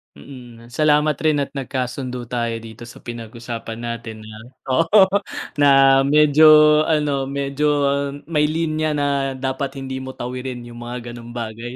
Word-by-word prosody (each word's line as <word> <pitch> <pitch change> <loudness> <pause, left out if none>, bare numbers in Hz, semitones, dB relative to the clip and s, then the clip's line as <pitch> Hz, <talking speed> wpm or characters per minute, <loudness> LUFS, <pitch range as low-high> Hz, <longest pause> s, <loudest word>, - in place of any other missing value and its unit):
Mm, 120 - -13
salamat 150 +2 +2
rin 155 -2 +2
at - - -9
nagkasundo 125 -1 -4
tayo 120 -1 -1
dito 115 +1 -11
sa - - -14
pinag-usapan 115 -1 -7
natin 115 -2 -6
na 110 0 -11 0.4
oo 165 +5 +3 0.7
na 145 - +5 0.4
medyo 150 +1 +5 0.4
ano, 145 -4 0
medyo 140 +1 -2 0.6
may 150 -2 +2
linya 155 -1 -1
na 145 -1 0 0.3
dapat 135 +1 -3
hindi 130 0 -5
mo 130 0 -7
tawirin 125 0 -6
yung 120 0 -11
mga 120 0 -7
ganung 120 0 -10
bagay. 115 +1 -6
130 Hz, 140 wpm, -20 LUFS, 120-145 Hz, 0.7 s, na